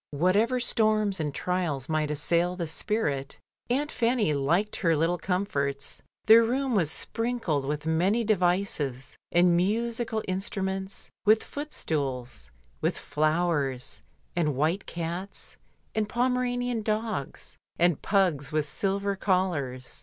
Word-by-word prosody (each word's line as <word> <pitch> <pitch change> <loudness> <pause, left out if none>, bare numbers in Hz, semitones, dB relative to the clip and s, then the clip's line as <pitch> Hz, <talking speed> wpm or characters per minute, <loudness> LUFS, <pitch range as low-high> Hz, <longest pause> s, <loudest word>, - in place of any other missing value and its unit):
Whatever 200 - +2
storms 215 -5 +2
and 150 -2 -1
trials 160 -5 -2
might 155 -2 0
assail 170 +4 +1
the 175 -2 -3
spirit, 150 -5 -2 0.3
Aimt 285 +5 0
Fanny 230 -8 +1
liked 165 +9 +1
her 165 -3 +2
little 165 +3 +1
comforts. 145 -7 -2 0.2
The 220 +1 +9
room 250 +3 +2
was 175 -8 +2
sprinkled 225 - -2
with 150 +2 -3
many 180 +8 +2
devices, 180 - 0 0.2
and 175 0 +5
musical 225 +4 0
instru 190 +1 -2
ments, 190 0 -5
with 215 +2 +4
footstools, 135 - -4 0.3
with - - 0
flowers, 155 -5 -1 0.3
and 155 -5 +1
white 160 +8 0
cats, 175 +3 -6 0.4
and 215 -1 -1
Pomeranian 245 -1 0
dogs, 215 -8 -3 0.2
and 175 -3 +3
pugs 175 -9 +1
with 155 -1 +1
silver 195 +6 -1
collars. 175 -10 -1
180 Hz, 120 wpm, -27 LUFS, 150-215 Hz, 0.4 s, The